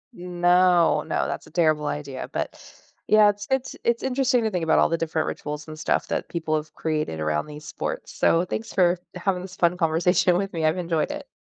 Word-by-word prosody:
No, 175 0 +3
no, - - -1
that's - - -5
a - - -16
terrible 155 -3 +2
idea, 140 -3 -5
but - - -3 0.5
yeah, 215 -1 +6
it's 205 0 -4
it's 265 -1 -1
it's 235 0 +1
interesting 260 -2 +1
to 220 - 0
think 180 -3 -2
about 160 - +3
all - - +5
the 165 - 0
different 160 -1 -1
rituals, 150 +1 -5
and 155 0 -8
stuff, 155 - 0
that - - -3
people 160 -2 -1
have 155 0 -4
created 155 - -2
around 75 - -1
these 150 0 -10
sports, - - -5
so 170 +2 +2
thanks 220 +5 -5
for 175 -2 +3 0.2
having 180 0 -1
this 180 0 -9
fun 175 0 +2
conversation 175 +2 +2
with 195 0 -3
me, 165 -2 -1
I've 155 +3 +2
enjoyed 170 -3 -1
it. 290 -1 -7
175 Hz, 210 wpm, -24 LUFS, 155-185 Hz, 0.5 s, yeah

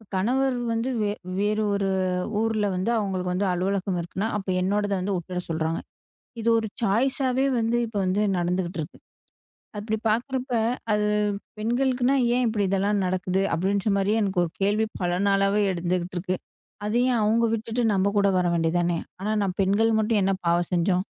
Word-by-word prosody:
கணவர் 255 +7 +1 0.2
வந்து 230 +3 -1
வே 205 - +1 0.3
வேறு 210 +1 +1
ஒரு 200 -1 0 0.5
ஊர்ல 220 -2 +1
வந்து 185 +5 -1
அவங்களுக்கு 185 -3 -2
வந்து 195 +2 0
அலுவலகம் 185 0 -1
இருக்குன்னா, 190 +5 -3
அப்ப 195 - -7
என்னோடத 205 +2 0
வந்து 195 +1 -1
உட்ற 180 +1 -5
சொல்றாங்க. 160 0 -1 0.6
இது 225 - -1
ஒரு 220 - -2 0.2
சாய்ஸ்ஸாவே 260 +5 +1
வந்து, 230 +1 +1
இப்ப 220 -2 -9
வந்து 195 +3 +1 0.2
நடந்துட்டு 175 0 -1
இருக்கு. 150 - -8 0.8
அப்படி 220 +1 -2
பாக்குறப்ப, 255 +4 -1 0.4
அது 210 0 +2 0.5
பெண்களுக்குன்னா 250 +3 +1 0.2
ஏன்! 250 - +2
இப்படி 215 -2 0
இதெல்லாம் 200 +1 +1
நடக்குது 185 +1 0
அப்படின்னு 200 +2 +1
ஒரு 165 - -4
கேள்வி 210 +3 +2 0.2
பல 175 0 +1 0.2
நாளாகவே 195 +1 +3
எழுந்துகிட்டு 180 +1 -2
இருக்கு. 185 +1 -2 0.5
அதை 215 +3 +1
ஏன் 235 - +1
அவங்க 225 +2 +3
விட்டுட்டு 225 +2 -2
நம்ம 195 +1 +2
கூட 200 0 +4
வர 180 - +1
வேண்டியதானே? 170 +1 +1 0.2
ஆனா, 210 +3 -2
நம் 190 -1 -2
பெண்கள் 205 +4 +2
மட்டும், 215 -1 +2
என்ன 195 - +2
பாவம் 170 0 +1
செஞ்சோம்? 180 +1 +2
200 Hz, 155 wpm, -25 LUFS, 185-225 Hz, 0.8 s, கூட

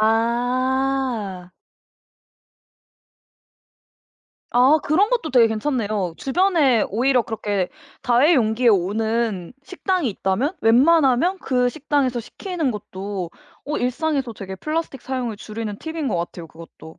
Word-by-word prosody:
아. 240 -3 0 3.0
아 260 +6 +5
그런 370 +8 +3
것도 470 -11 -1
되게 240 -3 +6
괜찮네요. 215 - -2
주변에 290 - +2
오히려 250 +4 +2
그렇게 205 -5 -2 0.3
다회용기에 245 -3 +3
오는 215 0 0
식당이 370 -4 -1
있다면 215 - -1
웬만하면 275 +7 +4
그 250 -6 +1
식당에서 275 -4 -1
시키는 335 - -3
것도 195 -3 -6 0.3
어 300 +1 -3
일상에서 270 0 -1
되게 190 -1 -7
플라스틱 305 - -3
사용을 250 -5 -3
줄이는 215 -1 -6
팁인 320 -3 -4
것 - - -1
같아요, 170 0 -5
그것도. 160 -1 -14
245 Hz, 260 characters per minute, -22 LUFS, 210-285 Hz, 3.0 s, 되게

